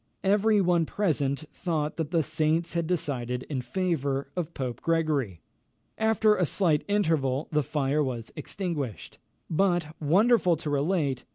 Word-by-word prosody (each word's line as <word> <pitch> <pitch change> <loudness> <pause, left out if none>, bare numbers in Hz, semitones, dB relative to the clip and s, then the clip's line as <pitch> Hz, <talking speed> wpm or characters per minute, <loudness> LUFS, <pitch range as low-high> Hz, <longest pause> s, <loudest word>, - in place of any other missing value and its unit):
Every 205 +2 +3
one 175 -3 +2
present 150 -7 0
thought 155 -4 -2
that 160 -3 -2
the 165 -2 +2
saints 155 +2 0
had 170 -1 -1
decided 130 -8 -2
in 130 -3 -1
favour 140 -1 -1
of 170 -2 -4
Pope 125 -3 -4
Gregory. 150 - 0 0.5
After 220 -1 +3
a 185 - +1
slight 160 -5 +2
interval, 160 -9 +1
the 150 -1 +2
fire 150 0 0
was 120 -4 -5
extinguished; 150 - -5 0.3
but, 175 -2 +1
wonderful 180 +4 +4
to 150 -1 -4
relate! 145 -3 0
155 Hz, 135 wpm, -27 LUFS, 140-180 Hz, 0.5 s, wonderful